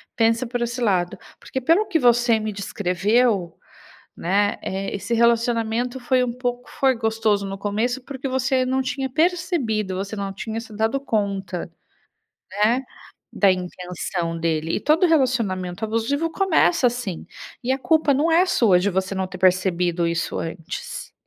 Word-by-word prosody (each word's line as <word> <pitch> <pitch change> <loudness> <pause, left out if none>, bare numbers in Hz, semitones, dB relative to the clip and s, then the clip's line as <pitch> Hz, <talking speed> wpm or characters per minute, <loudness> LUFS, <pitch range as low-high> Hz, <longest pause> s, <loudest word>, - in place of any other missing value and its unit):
Pensa 230 +2 +2
por 245 0 -3
esse 235 +1 -2
lado. 185 -6 +1 0.2
Porque 260 - -4
pelo 340 - +3
que 335 -5 +1
você 240 -2 +4
me 215 -1 -3
descreveu, 195 0 0 0.6
né, 205 +3 +1
eh, 195 +1 -3
esse 205 +4 -2
relacionamento 235 +1 +1
foi 255 +1 +2
um 240 - -2
pouco, 245 -1 -3
foi 265 -1 +2
gostoso 220 -3 0
no 195 - -5
começo, 225 +6 -1
porque 270 0 -5
você 260 0 +1
não 260 +1 +1
tinha 265 +1 -2
percebido, 310 - 0
você 195 +3 -4
não 200 -1 -3
tinha 220 +3 -5
se 225 -2 -11
dado 225 +5 0
conta, 200 -8 -2 0.8
né, 220 +6 +2 0.5
da 200 - +4
intenção 180 -1 -4
dele. 165 -1 -1
E - - -2
todo 315 +5 +3
relacionamento 220 - 0
abusivo 250 +9 -1
começa 345 -6 +3
assim, 235 -8 -3 0.4
e 260 - +1
a 265 - -1
culpa 315 -1 +3
não 300 +5 +2
é 345 +3 +4
sua 210 - +4
de 185 +3 +1
você 190 +1 -1
não 190 0 -1
ter 185 0 -9
percebido 180 -2 +2
isso 170 0 -2
antes, 165 +2 -6
225 Hz, 155 wpm, -22 LUFS, 190-260 Hz, 0.8 s, você